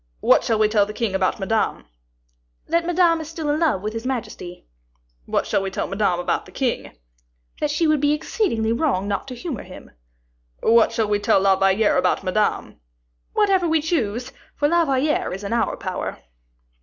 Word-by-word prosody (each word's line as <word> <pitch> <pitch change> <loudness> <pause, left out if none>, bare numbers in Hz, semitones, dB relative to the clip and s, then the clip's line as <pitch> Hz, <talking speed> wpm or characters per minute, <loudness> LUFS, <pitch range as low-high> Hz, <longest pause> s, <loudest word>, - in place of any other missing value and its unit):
"What - - +4
shall 225 - +1
we 215 0 +4
tell 210 -1 +2
the 210 - -6
king 230 -5 -1
about 190 +1 0
Madame?" 195 - -1 0.8
"That 335 0 +1
Madame 345 -2 +3
is 315 - -8
still 320 -2 -3
in 300 - 0
love 310 - +1
with 215 +1 -3
his 225 0 -5
majesty." 230 -8 -5 0.6
"What - - 0
shall 200 - 0
we 195 - -2
tell 190 - -3
Madame 195 -3 0
about 175 - -1
the - - -14
king?" 240 - -3 0.6
"That 300 - 0
she 300 +3 +1
would 310 -2 +2
be 290 0 +3
exceedingly 295 - 0
wrong 235 -8 0
not 200 +4 -2
to 255 - -7
humor 265 - -5
him." 185 - -12 0.7
"What 230 0 +5
shall 220 -2 0
we 205 0 +1
tell 205 - +3
La 195 0 +4
Valliere 195 +2 +2
about 180 - +1
Madame?" 205 +3 -1 0.6
"Whatever 385 -4 +2
we 320 0 +2
choose, 255 -6 -2 0.2
for 290 - +1
La 340 +2 +3
Valliere 275 - 0
is 195 +2 -6
in 200 - -3
our 235 - 0
power." - - -4
230 Hz, 190 wpm, -22 LUFS, 200-305 Hz, 0.8 s, What